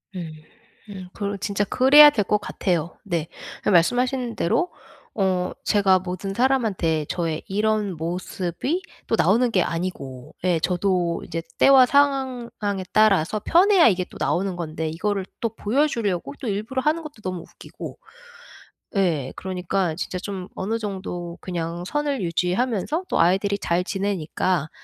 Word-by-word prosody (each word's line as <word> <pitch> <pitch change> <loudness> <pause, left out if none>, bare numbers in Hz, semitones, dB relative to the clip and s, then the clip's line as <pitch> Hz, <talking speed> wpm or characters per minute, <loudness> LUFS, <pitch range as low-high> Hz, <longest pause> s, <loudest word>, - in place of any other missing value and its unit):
음. 170 -3 -5 0.6
음 190 -2 -8
그래 200 -1 -3
진짜 200 +1 -1
그래야 275 +7 +8
될 215 -8 0
것 210 - +2
같아요 175 -5 -2
네. 170 -5 -2 0.4
그 - - +1
말씀하신 245 +7 +2
대로 355 - +1 0.5
어 185 -3 0
제가 195 -3 +3
모든 185 +2 -5
사람한테 210 - +1
저의 165 -3 -2
이런 210 -1 0
모습이 180 - -3 0.3
또 - - +2
나오는 225 +8 +3
게 185 -5 +3
아니고 155 -8 -4
예 180 -3 +2
저도 180 -1 0
이제 165 - -4 0.2
때와 265 -2 +7
상황에 255 -8 0
따라서 215 -2 +3
편해야 370 - +6
이게 185 -4 +2
또 - - -12
나오는 190 +1 0
건데 160 -1 -3
이거를 195 +4 -2
또 230 - 0
보여 260 +10 +1
주려고 195 - -2
또 250 - -4
일부러 215 +6 -2
하는 310 +4 +1
것도 290 -8 -11
너무 185 -2 -4
웃기고 - - -10 1.0
예. 160 -9 +1
그러니까 185 -2 -2
진짜 185 - -4
좀 190 -1 -6
'어느 220 +4 -2
정도 185 -5 -5
그냥 175 -1 -4
선을 290 -5 -1
유지하면서 195 - 0
또 - - +1
아이들이 195 +3 +2
잘 175 -1 0
지내니까 185 -4 -1
195 Hz, 295 characters per minute, -23 LUFS, 175-230 Hz, 1.0 s, 그래야